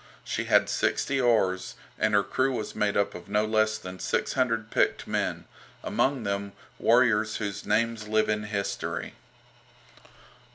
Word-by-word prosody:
She -, -, -3 dB
had -, -, +4 dB
sixty 135 Hz, -1 st, 0 dB
oars, 95 Hz, -7 st, +1 dB, 0.2 s
and 110 Hz, -1 st, +2 dB
her 100 Hz, -, +4 dB
crew 130 Hz, +4 st, 0 dB
was 110 Hz, -3 st, -4 dB
made 105 Hz, -1 st, 0 dB
up 100 Hz, 0 st, +1 dB
of 90 Hz, -, -10 dB
no 105 Hz, +1 st, +2 dB
less 110 Hz, 0 st, +2 dB
than 95 Hz, -3 st, -9 dB
six -, -, -1 dB
hundred 115 Hz, -4 st, 0 dB
picked -, -, +1 dB
men, -, -, -2 dB, 0.4 s
among 135 Hz, -3 st, 0 dB
them 100 Hz, -1 st, -3 dB, 0.3 s
warriors 115 Hz, -3 st, +3 dB
whose 100 Hz, -3 st, -5 dB
names 110 Hz, 0 st, 0 dB
live 110 Hz, 0 st, +2 dB
in 105 Hz, 0 st, -1 dB
history. 100 Hz, -1 st, -3 dB
110 Hz, 150 wpm, -27 LUFS, 100-115 Hz, 0.4 s, had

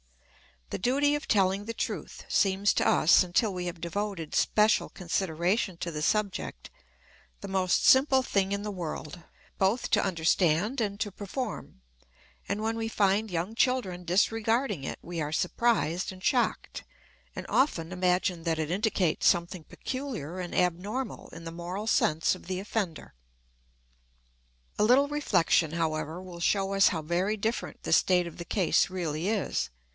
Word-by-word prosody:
The -, -, -3 dB
duty 280 Hz, +8 st, +2 dB
of 295 Hz, -, -5 dB
telling 195 Hz, 0 st, +2 dB
the 230 Hz, -, -4 dB
truth -, -, -5 dB
seems 195 Hz, +1 st, +2 dB
to -, -, +2 dB
us, 165 Hz, -, +5 dB
until 185 Hz, +4 st, +1 dB
we 180 Hz, -1 st, -4 dB
have 175 Hz, -1 st, -6 dB
devoted 175 Hz, -2 st, -4 dB
special 215 Hz, 0 st, +3 dB
consideration 180 Hz, +2 st, -1 dB
to 170 Hz, 0 st, -4 dB
the 150 Hz, -1 st, -4 dB
subject, 205 Hz, +4 st, -2 dB, 0.7 s
the 200 Hz, -, -7 dB
most 190 Hz, -1 st, +1 dB
simple 265 Hz, 0 st, +5 dB
thing 195 Hz, -5 st, 0 dB
in 200 Hz, 0 st, -2 dB
the 210 Hz, -, -3 dB
world, 170 Hz, -2 st, -6 dB, 0.4 s
both 195 Hz, +6 st, +1 dB
to 210 Hz, -, +3 dB
understand 180 Hz, -, +1 dB
and 205 Hz, -3 st, -1 dB
to 205 Hz, -, -1 dB
perform; 205 Hz, -, -6 dB, 0.7 s
and 205 Hz, +1 st, -2 dB
when 225 Hz, +1 st, -1 dB
we 225 Hz, 0 st, -2 dB
find 210 Hz, 0 st, +1 dB
young 175 Hz, +4 st, -3 dB
children 225 Hz, -8 st, 0 dB
disregarding 225 Hz, -, +1 dB
it -, -, -4 dB
we 170 Hz, -1 st, -5 dB
are 150 Hz, 0 st, -3 dB
surprised 180 Hz, -1 st, 0 dB
and 185 Hz, 0 st, -12 dB
shocked, 250 Hz, -4 st, 0 dB, 0.5 s
and -, -, -6 dB
often 180 Hz, -, +1 dB
imagine 180 Hz, -1 st, 0 dB
that 165 Hz, -1 st, 0 dB
it 155 Hz, 0 st, -2 dB
indicates 190 Hz, -4 st, +1 dB
something 170 Hz, -2 st, +1 dB
peculiar 240 Hz, -, -5 dB
and 180 Hz, -1 st, -5 dB
abnormal 195 Hz, +8 st, -1 dB
in 165 Hz, -, -9 dB
the 165 Hz, -, -6 dB
moral 175 Hz, +5 st, -5 dB
sense 160 Hz, -7 st, +2 dB
of -, -, -10 dB
the 185 Hz, 0 st, -3 dB
offender. 200 Hz, -5 st, -4 dB, 1.7 s
A -, -, +4 dB
little 270 Hz, +5 st, +4 dB
reflection, 180 Hz, -, +2 dB
however, 160 Hz, 0 st, -2 dB
will 180 Hz, -2 st, -10 dB
show 195 Hz, +3 st, +1 dB
us 195 Hz, 0 st, +5 dB
how 160 Hz, -, 0 dB
very 180 Hz, +6 st, 0 dB
different 220 Hz, +3 st, -3 dB
the -, -, 0 dB
state 180 Hz, -1 st, +4 dB
of 170 Hz, -, -9 dB
the 170 Hz, -, -7 dB
case 185 Hz, -3 st, +2 dB
really 170 Hz, -2 st, -3 dB
is. 185 Hz, -, -1 dB
190 Hz, 155 wpm, -28 LUFS, 170-215 Hz, 1.7 s, us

